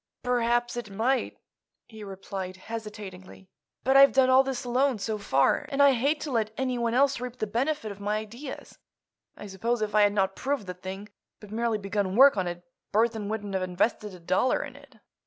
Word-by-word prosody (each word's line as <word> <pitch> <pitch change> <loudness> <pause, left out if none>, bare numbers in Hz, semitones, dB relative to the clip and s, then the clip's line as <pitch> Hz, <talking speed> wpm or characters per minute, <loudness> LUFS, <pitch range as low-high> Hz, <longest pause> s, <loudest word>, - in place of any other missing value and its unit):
"Perhaps 240 -1 +1
it 235 -3 -5
might," 235 +7 0 0.5
he 220 -2 -11
replied, 190 -1 -6
hesitatingly. 200 -3 -9 0.3
"But 265 +1 +2
I've 275 0 +8
done 260 -1 +4
all 260 +1 +7
this 270 -2 -3
alone, 255 +1 +1
so 215 +1 -3
far, 135 -9 +2
and 275 - -3
I 280 0 +7
hate 280 +5 +1
to 295 - -4
let 220 -3 0
anyone 245 -3 -1
else 275 0 +3
reap 250 0 -6
the 215 - -1
benefit 240 +2 -1
of 200 - -10
my 205 +1 -1
ideas. 235 +6 -8 0.6
I - - -9
suppose 225 +5 -2
if 210 -1 -3
I 210 - +5
had 205 0 +4
not 195 -1 +1
proved 270 -5 -2
the 180 - -5
thing, 190 +3 -8 0.3
but 210 -1 -13
merely 230 0 0
begun 200 -1 -2
work 270 +2 +7
on 190 -3 -1
it, 175 0 -6 0.3
Burthon 220 -1 +1
wouldn't 205 -2 -4
have 190 - 0
invested 190 +3 -1
a - - -13
dollar 185 +9 +1
in - - -9
it." - - -17
220 Hz, 195 wpm, -27 LUFS, 200-250 Hz, 0.6 s, I've